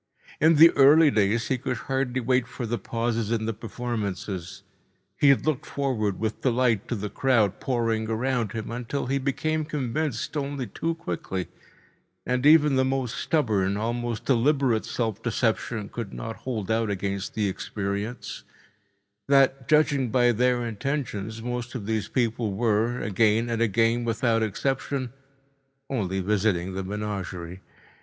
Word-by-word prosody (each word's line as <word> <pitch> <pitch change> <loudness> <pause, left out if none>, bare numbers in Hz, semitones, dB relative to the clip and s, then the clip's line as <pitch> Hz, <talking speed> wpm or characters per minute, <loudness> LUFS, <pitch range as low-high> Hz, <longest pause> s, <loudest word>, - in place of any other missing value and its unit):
In 160 +2 +5
the 165 +3 +9
early 145 +2 +6
days 110 +1 +1
he 130 - 0
could 125 -1 -2
hardly 130 0 -1
wait 125 0 +1
for 125 - -5
the 115 0 -2
pauses 115 +1 -2
in 115 -1 0
the 115 - -1
performances. 100 -5 -5 0.5
He 145 - +4
had 140 - +4
looked 155 -2 -1
forward 115 -8 -1
with 110 0 -3
delight 120 -4 +1
to 120 - -2
the 105 -1 -3
crowd 115 -7 +2
pouring 115 -3 -1
around 115 -1 -1
him, 110 0 -5
until 125 +4 -3
he 135 +2 0
became 155 +4 -1
convinced 150 -2 -2
only 140 -2 -2
too 165 +6 -3
quickly—and 95 - -5
even 150 -3 +6
the 130 - +4
most 130 -3 -1
stubborn, 100 -10 +1
almost 120 +1 -2
deliberate 130 -2 +2
self 110 -4 -2
deception 110 -4 -1
could 115 -3 -6
not 115 0 -6
hold 110 -6 -4
out 110 -1 +1
against 100 0 -3
the 105 -2 +1
experience—that, 105 +5 -3
judging 145 -4 +3
by 120 +1 +4
their 120 +1 +1
intentions, 110 -2 -3
most 125 +1 -4
of 110 -5 -4
these 110 -2 -1
people 115 -3 -1
were, 115 +3 +1
again 110 +3 +2
and 115 0 -1
again 115 +2 +2
without 115 0 +1
exception, 130 +4 -2 0.8
only 95 -7 -1
visiting 95 -2 0
the 95 +1 -3
menagerie. 95 -3 -5
115 Hz, 140 wpm, -26 LUFS, 105-130 Hz, 0.8 s, the